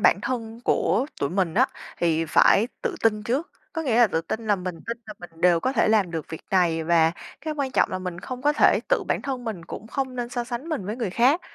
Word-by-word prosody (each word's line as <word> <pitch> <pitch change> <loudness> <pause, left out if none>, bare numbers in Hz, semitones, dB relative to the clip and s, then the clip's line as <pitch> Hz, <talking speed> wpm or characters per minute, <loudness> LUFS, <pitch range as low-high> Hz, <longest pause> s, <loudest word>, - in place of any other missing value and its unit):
bản - - +4
thân 230 -3 -4
của 265 - +2
tụi 140 - 0
mình 180 -3 0
á, - - +5 0.3
thì 165 -1 +2
phải 205 +7 +4
tự 475 -6 -1
tin 215 -2 +2
trước. 260 +10 -1 0.2
Có 325 - -2
nghĩa 250 -7 +1
là 240 - +7
tự 165 -5 -1
tin 220 +7 -5
là 205 -1 +3
mình 185 -1 -4
tin 230 - -3
là 215 - -8
mình 165 -2 -12
đều 175 -1 +4
có 260 - 0
thể 230 - +2
làm 210 -5 +3
được 160 -3 -4
việc 160 - -7
này, 170 -4 +2
và 165 0 +4 0.3
cái 310 -1 -4
quan 275 -2 -1
trọng - - +2
là 185 - -2
mình 180 -1 -5
không 255 +4 -7
có 295 +1 +4
thể - - +4
tự - - +2
bản - - 0
thân 260 -3 -4
mình 205 -7 -5
cũng 210 - -8
không 260 +2 -3
nên 240 -1 -2
so 245 0 -3
sánh 245 +5 -5
mình 295 - -3
với 210 +3 -3
người 230 -6 -2
khác. 255 - +3
220 Hz, 260 wpm, -25 LUFS, 175-255 Hz, 0.3 s, là